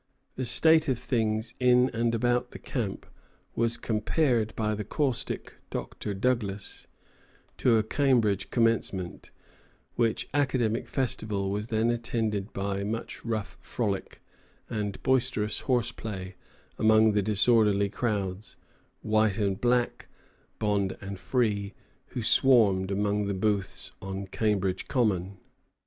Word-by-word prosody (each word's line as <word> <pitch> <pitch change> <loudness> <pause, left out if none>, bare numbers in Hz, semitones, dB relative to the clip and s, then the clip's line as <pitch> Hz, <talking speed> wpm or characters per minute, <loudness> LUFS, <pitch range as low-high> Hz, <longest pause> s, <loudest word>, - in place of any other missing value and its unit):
The 130 - -3
state 160 +6 +4
of 130 - +1
things 115 -2 -1
in 125 0 +4
and 115 0 0
about 120 +1 +1
the - - -9
camp 110 -8 -4 0.5
was 115 0 +1
compared 115 +1 +1
by 110 -1 0
the 105 0 -3
caustic 135 +3 -2
Dr. 100 - -5
Douglas 105 -3 -2 0.7
to 120 -3 +4
"a 110 - +2
Cambridge 110 -5 +2
Commencement," 115 -6 0 0.6
which 115 -2 0
academic 130 -6 +1
festival 105 -7 -1
was 105 +2 -3
then 115 0 +1
attended 110 -3 -2
by 100 0 -2
much 110 +3 -4
rough 110 -3 -3
frolic 100 -5 -3 0.5
and 105 -2 -3
boisterous 125 -5 +1
horseplay 110 -6 -2 0.5
among 110 0 +5
the 105 0 +2
disorderly 105 -1 +3
crowds, 100 -3 -3 0.5
white 110 -2 +2
and 100 -2 0
black, 120 0 +1 0.5
bond 100 -2 0
and 100 -1 -7
free, 105 -2 0 0.3
who 120 - -5
swarmed 110 -8 +4
among 100 +1 0
the 100 - -1
booths 95 -3 -1
on 95 0 -5
Cambridge 95 -2 -1
Common. 100 -7 0
110 Hz, 120 wpm, -28 LUFS, 100-120 Hz, 0.7 s, among